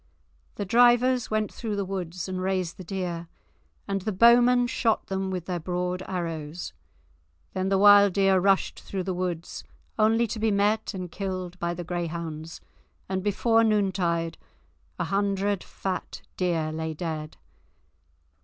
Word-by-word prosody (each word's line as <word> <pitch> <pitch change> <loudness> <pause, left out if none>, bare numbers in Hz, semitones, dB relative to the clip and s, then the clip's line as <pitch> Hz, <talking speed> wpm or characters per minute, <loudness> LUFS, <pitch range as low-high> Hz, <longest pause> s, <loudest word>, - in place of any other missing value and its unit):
The 205 - -3
drivers 245 +3 +4
went 215 -1 -1
through 220 -3 -4
the 200 -1 -1
woods 185 -2 -4
and 185 -1 -3
raised 185 -2 -1
the 185 - -8
deer, 175 -2 -4 0.6
and 195 -1 -1
the 215 - -2
bowmen 240 +4 +6
shot 235 -2 0
them 190 0 -2
with 180 -3 -4
their 180 -2 -2
broad 180 +2 -2
arrows. 165 -3 -4 0.8
Then 190 0 -1
the 195 - +3
wild 205 -1 +7
deer 195 -1 +4
rushed 195 +1 +2
through 190 -2 -4
the 190 0 -2
woods, 175 -2 -4 0.4
only 225 +2 +4
to 225 0 -5
be 220 +1 +2
met 210 +1 +1
and 180 -2 -5
killed 185 -2 -4
by 170 0 -2
the 175 - -5
greyhounds, 165 -2 -5 0.5
and 190 0 -2
before 225 +3 +2
noontide 185 -6 0 0.6
a - - -1
hundred 200 0 0
fat 190 -1 -5
deer 165 -4 0
lay 160 0 -4
dead. 155 -2 -5
190 Hz, 145 wpm, -26 LUFS, 175-205 Hz, 0.8 s, wild